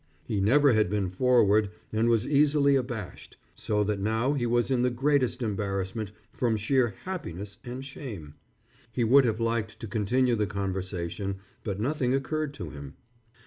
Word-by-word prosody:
He 105 Hz, -4 st, -1 dB
never 140 Hz, +6 st, +5 dB
had 110 Hz, -4 st, +3 dB
been 100 Hz, -2 st, 0 dB
forward 110 Hz, -2 st, +3 dB, 0.2 s
and 110 Hz, +2 st, +2 dB
was 115 Hz, -1 st, +3 dB
easily 145 Hz, -1 st, +4 dB
abashed, 120 Hz, -7 st, -4 dB, 0.2 s
so 105 Hz, -1 st, 0 dB
that 105 Hz, -1 st, -1 dB
now 110 Hz, +7 st, +1 dB
he 125 Hz, -4 st, 0 dB
was 120 Hz, +2 st, +1 dB
in 125 Hz, -2 st, +2 dB
the 125 Hz, -, +3 dB
greatest 130 Hz, 0 st, +1 dB
embarrassment 100 Hz, 0 st, -2 dB, 0.2 s
from 120 Hz, -4 st, 0 dB
sheer 120 Hz, 0 st, +1 dB
happiness 105 Hz, -, -6 dB
and 125 Hz, +2 st, -6 dB
shame. 105 Hz, -, -8 dB, 0.6 s
He 120 Hz, +1 st, 0 dB
would 135 Hz, +4 st, +6 dB
have 110 Hz, -1 st, 0 dB
liked 115 Hz, -2 st, -1 dB
to -, -, -6 dB
continue 120 Hz, +4 st, +1 dB
the 105 Hz, -2 st, 0 dB
conversation, 95 Hz, -1 st, -3 dB, 0.3 s
but 100 Hz, -3 st, -3 dB
nothing 130 Hz, +1 st, 0 dB
occurred 155 Hz, +2 st, -2 dB
to 80 Hz, -, -6 dB
him. 70 Hz, -1 st, -9 dB
115 Hz, 160 wpm, -28 LUFS, 100-130 Hz, 0.6 s, would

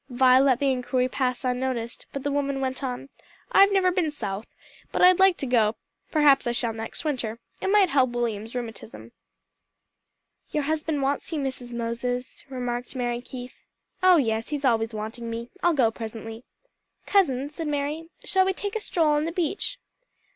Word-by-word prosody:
Vi 255 Hz, 0 st, +5 dB
let 265 Hz, -2 st, +4 dB
the 275 Hz, +1 st, +2 dB
inquiry 255 Hz, 0 st, 0 dB
pass 255 Hz, 0 st, -1 dB
unnoticed, 250 Hz, -2 st, -2 dB
but 275 Hz, -, -5 dB
the 285 Hz, -, -1 dB
woman 280 Hz, -1 st, -1 dB
went 265 Hz, +1 st, -2 dB
on, 255 Hz, +1 st, -4 dB, 0.4 s
"I've 395 Hz, +1 st, +6 dB
never 380 Hz, -2 st, +3 dB
been 355 Hz, -3 st, +1 dB
South, 210 Hz, -7 st, -5 dB, 0.4 s
but -, -, +1 dB
I'd 365 Hz, 0 st, +7 dB
like 380 Hz, -2 st, +5 dB
to -, -, -3 dB
go; 230 Hz, -4 st, +2 dB, 0.3 s
perhaps 290 Hz, -5 st, +4 dB
I 240 Hz, -, +1 dB
shall 235 Hz, -1 st, 0 dB
next 225 Hz, +7 st, -6 dB
winter. 240 Hz, -6 st, -2 dB, 0.2 s
It -, -, -1 dB
might 395 Hz, -2 st, +5 dB
help 265 Hz, -3 st, +3 dB
William's 230 Hz, -2 st, -3 dB
rheumatism." 115 Hz, -, -7 dB, 1.4 s
"Your 300 Hz, -, -1 dB
husband 305 Hz, -1 st, -1 dB
wants 280 Hz, +4 st, -1 dB
you, 320 Hz, -, -1 dB
Mrs. 260 Hz, -3 st, -4 dB
Moses," 240 Hz, +2 st, -3 dB
remarked 245 Hz, -1 st, -4 dB
Mary 240 Hz, -1 st, -1 dB
Keith. 250 Hz, 0 st, -8 dB, 0.5 s
"Oh 370 Hz, -1 st, +7 dB
yes; 225 Hz, -5 st, 0 dB
he's 295 Hz, -2 st, -2 dB
always 225 Hz, -2 st, +2 dB
wanting 220 Hz, +2 st, -5 dB
me. 230 Hz, +1 st, -5 dB
I'll 345 Hz, -2 st, +3 dB
go 240 Hz, -5 st, +3 dB
presently." 225 Hz, +1 st, -7 dB, 0.6 s
"Cousin," 280 Hz, -10 st, +2 dB
said 315 Hz, +1 st, -5 dB
Mary, 295 Hz, +3 st, -2 dB
"shall 380 Hz, -1 st, +3 dB
we 380 Hz, -, +1 dB
take 405 Hz, +3 st, -5 dB
a -, -, 0 dB
stroll 335 Hz, -6 st, +1 dB
on 295 Hz, +1 st, +2 dB
the 330 Hz, -, -2 dB
beach?" 360 Hz, +8 st, -2 dB
260 Hz, 175 wpm, -26 LUFS, 235-300 Hz, 1.4 s, I'd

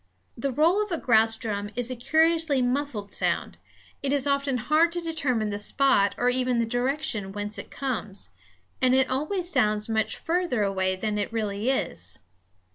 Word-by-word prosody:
The 270 Hz, +4 st, -2 dB
roll 325 Hz, -, +3 dB
of 420 Hz, -, -8 dB
a 335 Hz, -, 0 dB
grouse 225 Hz, -4 st, +3 dB
drum 205 Hz, -2 st, -3 dB
is 245 Hz, +1 st, +1 dB
a -, -, -3 dB
curiously 320 Hz, +3 st, +2 dB
muffled 245 Hz, -5 st, -1 dB
sound; -, -, -1 dB, 0.4 s
it 275 Hz, -, -1 dB
is 285 Hz, -1 st, +1 dB
often 280 Hz, -2 st, +1 dB
hard 305 Hz, +8 st, +3 dB
to 350 Hz, -, -1 dB
determine 285 Hz, -10 st, -1 dB
the 205 Hz, -, -3 dB
spot 210 Hz, -3 st, +2 dB
or 245 Hz, -, +1 dB
even 250 Hz, -1 st, 0 dB
the 230 Hz, -, +2 dB
direction 245 Hz, -4 st, -1 dB
whence 205 Hz, +1 st, -3 dB
it -, -, -8 dB
comes; 220 Hz, -7 st, -3 dB, 0.5 s
and 255 Hz, 0 st, +4 dB
it 265 Hz, 0 st, +2 dB
always 325 Hz, +7 st, -1 dB
sounds 210 Hz, -6 st, +1 dB
much 220 Hz, -1 st, 0 dB
farther 335 Hz, -, 0 dB
away 190 Hz, -1 st, 0 dB
than 210 Hz, +2 st, -2 dB
it 205 Hz, -, -2 dB
really 215 Hz, 0 st, -2 dB
is. 90 Hz, -, -2 dB
250 Hz, 175 wpm, -26 LUFS, 210-285 Hz, 0.5 s, and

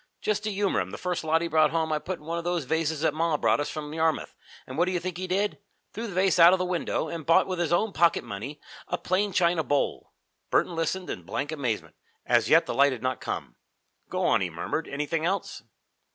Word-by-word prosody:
Just 210 Hz, 0 st, -1 dB
to 215 Hz, -, 0 dB
humor 200 Hz, -, +1 dB
him, 95 Hz, -1 st, -2 dB
the -, -, -7 dB
first 180 Hz, -2 st, -2 dB
lot 160 Hz, +1 st, +2 dB
he -, -, -1 dB
brought 155 Hz, -1 st, +4 dB
home 160 Hz, -1 st, -1 dB
I 155 Hz, -, +1 dB
put 185 Hz, +3 st, -4 dB
in 150 Hz, -, -18 dB
one 170 Hz, +1 st, -2 dB
of -, -, -6 dB
those 175 Hz, -2 st, -1 dB
vases 160 Hz, +2 st, -1 dB
that 160 Hz, -2 st, +2 dB
ma 160 Hz, 0 st, +1 dB
brought -, -, +2 dB
us 145 Hz, -, -1 dB
from 150 Hz, -1 st, -6 dB
Yarmouth, 160 Hz, 0 st, 0 dB, 0.3 s
and 130 Hz, -, -8 dB
what 170 Hz, +4 st, +3 dB
do 185 Hz, -, -1 dB
you 180 Hz, -, 0 dB
think 180 Hz, 0 st, -5 dB
he 185 Hz, +1 st, -4 dB
did? 195 Hz, +3 st, 0 dB, 0.3 s
threw 230 Hz, +2 st, -4 dB
the 195 Hz, -, -7 dB
vase 185 Hz, -1 st, +3 dB
out 170 Hz, +2 st, +9 dB
of -, -, +4 dB
the 185 Hz, -, -1 dB
window 175 Hz, -2 st, -1 dB
and 160 Hz, +1 st, -5 dB
bought 165 Hz, +2 st, +4 dB
with 185 Hz, -2 st, -3 dB
his 170 Hz, -1 st, 0 dB
own 195 Hz, +4 st, +2 dB
pocket 170 Hz, 0 st, +3 dB
money 120 Hz, +7 st, -7 dB, 0.3 s
a -, -, -1 dB
plain 200 Hz, +2 st, 0 dB
china 170 Hz, -2 st, +2 dB
bowl." 140 Hz, +1 st, -1 dB, 0.4 s
Burton 175 Hz, -, +1 dB
listened 180 Hz, +3 st, -2 dB
in -, -, -5 dB
blank 135 Hz, -, -4 dB
amazement. 130 Hz, -8 st, -3 dB, 0.3 s
As -, -, +3 dB
yet -, -, +6 dB
the -, -, -3 dB
light 140 Hz, 0 st, +4 dB
had 125 Hz, -, -8 dB
not 130 Hz, 0 st, -1 dB
come. -, -, -5 dB, 0.5 s
"Go -, -, -1 dB
on," -, -, +3 dB
he 90 Hz, -, 0 dB
murmured. 85 Hz, -, -3 dB
"Anything 150 Hz, +3 st, -2 dB
else?" 190 Hz, +4 st, -2 dB
165 Hz, 245 wpm, -27 LUFS, 150-180 Hz, 0.5 s, out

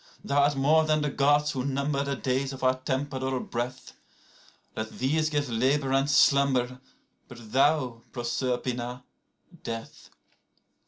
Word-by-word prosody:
103Thou 140 Hz, -, -2 dB
art 145 Hz, 0 st, +4 dB
more 150 Hz, +4 st, +4 dB
than 155 Hz, -1 st, +1 dB
the 150 Hz, -, -1 dB
Gods 145 Hz, +2 st, +3 dB
who 130 Hz, -3 st, -3 dB
number 140 Hz, +1 st, -1 dB
the 140 Hz, 0 st, -2 dB
days 130 Hz, +1 st, -1 dB
of 130 Hz, -, -9 dB
our 130 Hz, 0 st, +4 dB
temporal 130 Hz, 0 st, -2 dB
breath;104Let 120 Hz, -2 st, -8 dB
these 155 Hz, +4 st, +1 dB
give 145 Hz, -2 st, -1 dB
labour 130 Hz, +4 st, +1 dB
and 135 Hz, +1 st, +2 dB
slumber; 135 Hz, -3 st, +3 dB, 0.5 s
but 120 Hz, -4 st, -12 dB
thou, 130 Hz, -4 st, +2 dB
Proserpina, 125 Hz, 0 st, -3 dB, 0.6 s
death. 115 Hz, -2 st, -7 dB
135 Hz, 125 wpm, -27 LUFS, 125-145 Hz, 0.6 s, art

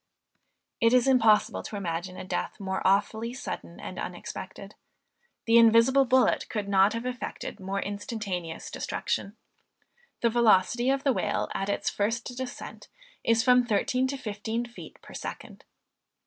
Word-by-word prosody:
It 230 Hz, +1 st, +4 dB
is 250 Hz, 0 st, +4 dB
impossible 225 Hz, -5 st, +4 dB
to -, -, -8 dB
imagine 180 Hz, -1 st, -4 dB
a -, -, -6 dB
death 185 Hz, -, -3 dB
more 190 Hz, -1 st, -3 dB
awfully 220 Hz, +4 st, +1 dB
sudden 270 Hz, -, -7 dB
and -, -, -7 dB
unexpected. -, -, -7 dB, 0.7 s
The 230 Hz, 0 st, +6 dB
invisible 230 Hz, +4 st, +6 dB
bullet 255 Hz, 0 st, +3 dB
could 210 Hz, -3 st, -3 dB
not 195 Hz, +1 st, +4 dB
have 230 Hz, +1 st, -4 dB
effected 250 Hz, -1 st, -5 dB
more 195 Hz, +1 st, -3 dB
instantaneous 200 Hz, -5 st, -5 dB
destruction. 200 Hz, +3 st, -3 dB, 0.8 s
The 235 Hz, -, +3 dB
velocity 235 Hz, +1 st, +3 dB
of 275 Hz, 0 st, +1 dB
the 275 Hz, -, +3 dB
whale -, -, -1 dB
at 195 Hz, -, -2 dB
its 200 Hz, -, -1 dB
first 230 Hz, +4 st, -2 dB
descent 255 Hz, 0 st, -7 dB, 0.4 s
is 230 Hz, 0 st, +3 dB
from 250 Hz, -1 st, +5 dB
thirteen 245 Hz, +3 st, +1 dB
to 275 Hz, +1 st, -3 dB
fifteen 220 Hz, 0 st, -3 dB
feet 240 Hz, 0 st, -12 dB
per -, -, -13 dB
second. -, -, -8 dB
230 Hz, 145 wpm, -27 LUFS, 200-245 Hz, 0.8 s, The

